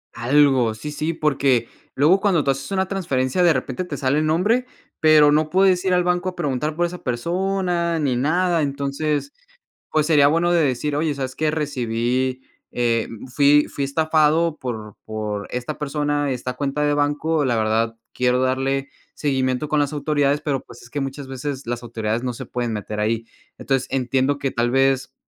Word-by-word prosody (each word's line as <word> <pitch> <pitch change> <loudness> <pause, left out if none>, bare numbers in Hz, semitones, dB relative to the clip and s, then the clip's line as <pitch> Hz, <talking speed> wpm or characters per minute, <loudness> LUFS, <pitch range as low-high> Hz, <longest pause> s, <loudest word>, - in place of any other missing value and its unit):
Algo, 130 -2 +3
sí, 150 +7 -6
sí, 155 +3 -2
porque 140 -7 +1 0.3
luego 160 +8 +4
cuando 190 -7 +2
tú 135 - +2
haces 135 0 -5
una 190 -1 0
transferencia 165 -6 -1
de 175 -1 +6
repente 150 +2 -2
te 150 -6 -6
sale 140 +3 +1
el 155 - 0
nombre, 210 +11 +2 0.3
pero 155 -2 +6
no 155 +1 +2
puedes 185 0 +3
ir 185 - +2
al 180 - +2
banco 180 +1 0
a 180 - -10
preguntar 150 -1 -2
por 175 +2 +1
esa 180 +1 -6
persona 170 +5 -1
ni 135 -4 0
nada. 165 +6 +1
Entonces, 145 - -2 0.6
pues 155 -1 +2
sería 145 -3 +5
bueno 170 +3 +2
de 170 - +4
decir: 145 +2 -1
"Oye, 155 0 0
sabes 130 -2 -4
qué, 155 -1 0
recibí 130 -3 -1 0.3
eh, 115 -2 +1
mm, 115 +3 -9
fui 145 +3 +4
fui 140 - -4
estafado 155 +2 +2
por 110 -5 -6
por 105 -2 -4
esta 125 +5 -4
persona, 145 -1 -1
esta 125 0 -3
cuenta 140 +2 -2
de 145 - +2
banco, 145 +2 +1
la 120 -4 +1
verdad 115 +1 0 0.2
quiero 125 0 +1
darle 135 +1 0 0.3
seguimiento 130 -1 0
con 150 0 +2
las 145 - -1
autoridades", 145 -1 +1
pero, 140 -3 -2
pues, - - -14
es 120 - -15
que 145 +3 -3
muchas 135 0 -5
veces 135 0 -5
las 120 0 -3
autoridades 115 0 -3
no 125 - -1
se - - -7
pueden 120 -2 -3
meter 105 0 -4
ahí, 115 +1 -1 0.3
entonces 135 -2 -1
entiendo 135 +2 0
que 135 -1 -1
tal 120 0 0
vez 135 0 +2
140 Hz, 185 wpm, -22 LUFS, 125-155 Hz, 0.6 s, de